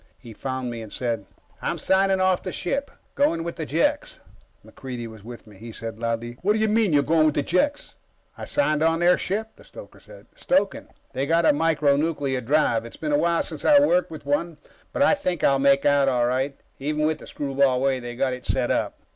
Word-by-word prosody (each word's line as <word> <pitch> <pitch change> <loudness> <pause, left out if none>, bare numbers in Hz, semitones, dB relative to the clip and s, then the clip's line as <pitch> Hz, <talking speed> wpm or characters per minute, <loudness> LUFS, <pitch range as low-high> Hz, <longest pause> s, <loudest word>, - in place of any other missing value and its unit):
He 115 -3 -12
found 130 +1 -4
me 115 -1 -6
and 110 -2 -10
said: 115 -5 -3 0.3
"I'm - - -2
signing 190 0 +2
off 185 -1 +2
the 185 - -5
ship. 275 +13 -2 0.2
Going 225 - +1
with 170 0 -5
the 160 -3 -5
Jeks." 290 - 0 0.5
MacReidie 125 -3 -7
was 110 -3 -11
with 120 +1 -10
me. 105 -3 -16
He 115 +3 -9
said 115 0 -7
loudly: 115 +1 -3
"What 205 +3 +2
do - - 0
you 220 - +2
mean, 215 -3 +2
you're 145 -1 +3
going 155 +1 +3
with 150 - 0
the 145 - +1
Jeks?" 285 - -1 0.4
"I - - -7
signed 155 - 0
on 165 +1 +3
their 175 +1 +5
ship," 220 +3 -3
the - - -16
stoker - - -13
said. - - -15
"Stoking. 205 -8 0 0.3
They've 135 +1 -2
got 165 0 +3
a - - +5
micro 150 -2 +2
nuclear 145 -4 -1
drive. 125 -3 +1
It's 115 - -11
been 155 -2 -3
a - - +5
while 170 +3 +2
since 160 -3 -8
I 295 - +6
worked 180 -11 +2
with 155 -3 -10
one, 150 +3 -1 0.3
but 280 - +1
I - - +5
think 180 - -2
I'll 135 -1 +4
make 140 0 +3
out 140 -1 +4
all 125 -2 +1
right, 130 +3 -1 0.2
even 150 +2 -1
with 155 0 0
the - - -12
screwball 135 -2 0
way 135 0 +1
they've 120 -1 -8
got 130 0 0
it 125 - -8
set 125 -2 0
up." - - -1
145 Hz, 225 wpm, -24 LUFS, 125-175 Hz, 0.5 s, I